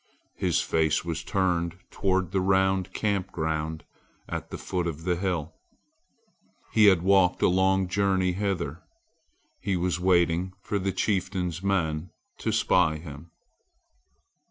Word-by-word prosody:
His - - +1
face 80 +1 +1
was 80 -2 -3
turned 90 -2 0
toward 95 -2 0
the 95 -1 +1
round 95 0 +2
camp 100 -3 -1
ground 80 0 -2 0.4
at - - -5
the - - -6
foot 90 -2 -2
of 80 -1 -5
the 90 0 +1
hill. 85 -4 -2 1.2
He 110 - +5
had 95 -4 +5
walked 95 -1 +3
a - - +6
long 95 +1 +2
journey 95 -1 +1
hither. 90 -5 -2 0.8
He 95 -2 -1
was 90 -1 -1
waiting 90 0 +2
for 100 - -1
the 95 +1 -1
chieftain's 95 -4 -1
men 90 -4 -1 0.3
to - - -1
spy 80 -1 +2
him. 75 0 -10
90 Hz, 130 wpm, -27 LUFS, 85-95 Hz, 1.2 s, a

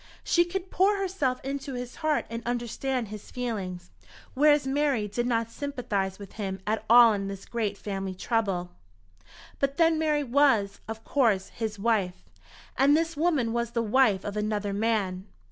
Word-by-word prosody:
She 345 0 +3
could 370 +1 -5
pour 400 +3 +3
herself 360 -10 -1
into 275 -1 -4
his 245 0 -6
heart 310 -2 0
and 230 0 -5
understand 240 0 -2
his 210 -1 -9
feelings, 195 - -4 0.4
whereas 295 +1 +4
Mary 270 -5 +1
did 240 +4 -2
not 230 -2 0
sympathize 225 -10 -3
with 200 -2 -10
him 190 -1 -3
at 215 +1 -1
all 235 -1 +8
in 195 -1 -2
this 195 -1 -7
great 215 -4 -2
family 195 -2 -4
trouble. 195 -4 -1 0.9
But 275 0 0
then 330 -1 +4
Mary 300 -2 +1
was, 245 -6 +2
of 225 0 -6
course, 225 -9 +1
his 220 -2 -4
wife, 200 -4 0 0.5
and 285 +3 +5
this 330 0 -1
woman 290 -8 +1
was 235 0 -2
the 235 -1 0
wife 220 -3 +3
of 205 - -4
another 210 -1 -1
man. 200 -3 -1
235 Hz, 160 wpm, -27 LUFS, 205-280 Hz, 0.9 s, all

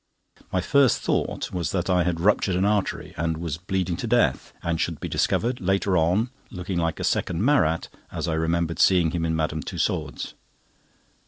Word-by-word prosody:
My 90 - +1
first 140 +4 +3
thought - - -1
was 90 -2 -1
that 90 -2 -1
I 90 -1 +3
had 85 -1 0
ruptured 95 0 +2
an 95 +2 +2
artery, 105 -2 0
and 80 0 -1
was 80 -2 -4
bleeding 95 -1 -1
to 120 - -4
death, 115 - +2
and 85 -1 -1
should - - -2
be - - -4
discovered, 120 +2 0
later 95 +1 +1
on, 90 +9 +2 0.2
looking 90 -4 -3
like 85 -1 -1
a - - -3
second 90 +4 0
Marat, 90 - +2 0.2
as - - -3
I 80 - 0
remember 85 +1 0
seeing 90 -4 +4
him 85 -1 -1
in 80 0 0
Madame 80 0 -1
Tussaud's. - - -3
90 Hz, 180 wpm, -25 LUFS, 80-95 Hz, 0.2 s, seeing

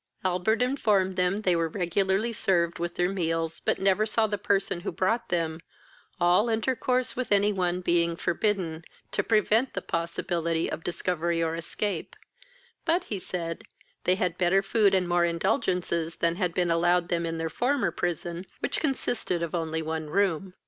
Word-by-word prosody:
Albert 185 +6 +2
informed 210 -8 +1
them 185 +3 +1
they 180 -3 +3
were 165 -1 +1
regularly 190 +5 0
served 170 -5 +1
with 175 0 -3
their 175 0 +1
meals, 165 -3 -1
but - - 0
never 195 +2 +3
saw 220 +1 +2
the 210 -1 -1
person 195 -2 0
who 175 - -4
brought 230 +5 0
them, 165 -2 -1 0.6
all 180 +6 +4
intercourse 250 +2 0
with 255 -3 -3
any 205 +1 +4
one 180 -1 0
being 170 -1 +2
forbidden, 175 -2 -1 0.3
to - - +1
prevent 225 +3 +2
the - - 0
possibility 170 0 -1
of 165 - -5
discovery 170 -1 -1
or 160 0 0
escape; 180 +5 -3 0.7
but, 340 +2 +2
he 205 - -4
said, 170 -2 -4 0.4
they 180 - +4
had 180 -2 -1
better 185 +2 +3
food 200 -1 +3
and 185 -1 +1
more 175 0 +3
indulgences 170 - 0
than 170 0 +1
had 180 -2 0
been 175 -2 +1
allowed 175 +1 +2
them 170 -1 0
in 165 0 -2
their 165 0 -2
former 245 - 0
prison, 175 +1 -3
which - - -1
consisted 245 - -1
only 160 -2 -1
of - - -7
one 160 -1 -3
room. 190 0 0
180 Hz, 170 wpm, -27 LUFS, 170-205 Hz, 0.7 s, all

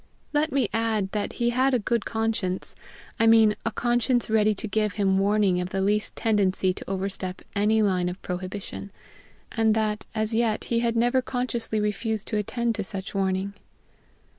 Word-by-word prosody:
Let 300 +1 +1
me 265 -5 +2
add 220 -4 0
that 210 -1 -2
he 240 0 0
had 260 +2 +2
a - - +4
good 235 0 -1
conscience 220 -5 -2 0.5
I 225 - +4
mean, 220 -2 +6
a 230 - 0
conscience 240 +1 +1
ready 215 -1 +3
to 220 - -5
give 215 0 0
him 195 -2 +2
warning 200 -2 +2
of 180 - -4
the 195 - -2
least 205 +2 +1
tendency 195 -4 +1
to - - -9
overstep 190 -1 -3
any 215 +2 +3
line 180 -3 +1
of 180 +2 -7
prohibition; 185 +2 -5 0.6
and 220 -2 +2
that, 215 -1 -1
as 215 +1 0
yet, 225 -1 +1
he 235 - 0
had 235 0 0
never 245 +3 +3
consciously 245 -4 -2
refused 210 +1 -1
to 215 - 0
attend 235 +3 -1
to 210 -2 -3
such 190 0 -6
warning. 195 0 -1
215 Hz, 175 wpm, -26 LUFS, 195-230 Hz, 0.6 s, mean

